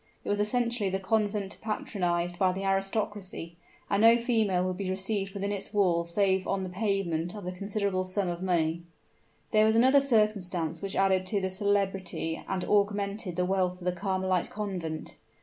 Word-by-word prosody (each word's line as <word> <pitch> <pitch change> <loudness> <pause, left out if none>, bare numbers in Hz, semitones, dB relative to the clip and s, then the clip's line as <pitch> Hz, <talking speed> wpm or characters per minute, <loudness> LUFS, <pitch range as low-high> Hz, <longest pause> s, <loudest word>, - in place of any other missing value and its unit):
It - - -4
was 205 - +1
essentially 235 -1 +1
the 190 - 0
convent 205 0 -1
patronized 175 -5 -2
by 185 -1 +3
the 190 +1 -4
aristocracy; 195 -3 -2 0.3
and 200 0 +1
no 230 +1 +7
female 220 -7 +1
would 185 -1 -2
be 195 -1 -3
received 195 +1 -2
within 200 +1 -2
its 200 +1 -4
walls 170 -4 +2
save 190 0 +2
on 195 -1 0
the 185 - -4
payment 185 -3 -1
of 205 -3 -7
a 180 - -2
considerable 200 0 -1
sum 185 +1 -1
of 175 0 -3
money. 170 -3 +1 0.7
There 215 -1 +5
was 220 +1 +4
another 260 +4 +6
circumstance 205 - +1
which 195 -1 -4
added 190 -1 +2
to 205 +1 +1
the 190 -1 -2
celebrity 195 -4 -1
and 185 -1 -1
augmented 200 -2 0
the 180 +1 +1
wealth 185 -1 +1
of 180 - -11
the 180 - +2
Carmelite 185 0 -1
Convent. 180 -7 -5
195 Hz, 175 wpm, -29 LUFS, 180-205 Hz, 0.7 s, no